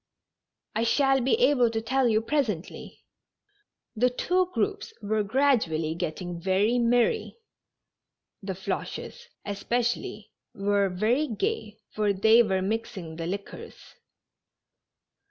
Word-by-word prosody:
I 220 - 0
shall 270 +2 +3
be 260 - +3
able 275 - +4
to 225 0 -2
tell 255 +3 +1
you 220 -1 +2
presently." 225 - -3 0.9
The 250 +3 +3
two 360 +8 0
groups 410 +4 -2
were 215 +1 0
gradually 205 - +1
getting 170 +1 -5
very 200 +6 +2
merry. 245 - +1 1.0
The 195 -1 -4
Floches, 475 - -5 0.2
especially, 225 0 -2 0.2
were 200 -1 +1
very 225 +11 +1
gay. 235 - -3
For 210 -1 +1
they 220 +4 +5
were 190 -4 0
mixing 195 -6 -4
the 165 0 -4
liquors. 200 +2 -6
220 Hz, 110 wpm, -27 LUFS, 195-255 Hz, 1.0 s, they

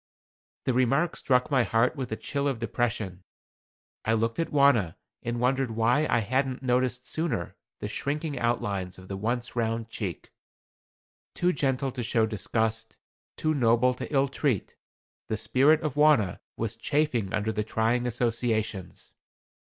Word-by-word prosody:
The 130 - +2
remark 135 +7 +2
struck 125 +1 +1
my 130 -2 +4
heart 115 +4 +2
with 130 -5 -5
a - - 0
chill 140 +5 -2
of 135 -4 0
depression. 110 -5 -2 0.8
I 110 - +1
looked 115 +3 0
at 165 - 0
Wauna 140 - +4 0.3
and 120 0 -3
wondered 130 +1 +1
why 115 +7 +2
I 115 - +3
had 130 +4 -1
noticed 125 0 +1
sooner 130 - -2 0.3
the - - -2
shrinking 145 0 -3
outlines 100 -6 -1
of 95 0 -13
the 100 - -3
once 120 +5 -2
round 115 -1 -1
cheek. 100 -6 -5 1.0
Too 180 +1 +2
gentle 135 -1 0
to 125 -1 -5
show 115 -1 +2
disgust, 110 +1 -1 0.4
too 155 0 +1
noble 125 -1 +3
to 125 - -7
ill 140 -1 +3
treat, 135 - -1 0.5
the 110 - -1
spirit 145 +8 +4
of 150 -4 -2
Wauna 145 - +4 0.2
was 115 0 -2
chafing 125 -5 0
under 110 +1 0
the 105 0 -1
trying 115 +3 0
associations. 115 -4 -2
120 Hz, 150 wpm, -27 LUFS, 110-135 Hz, 1.0 s, my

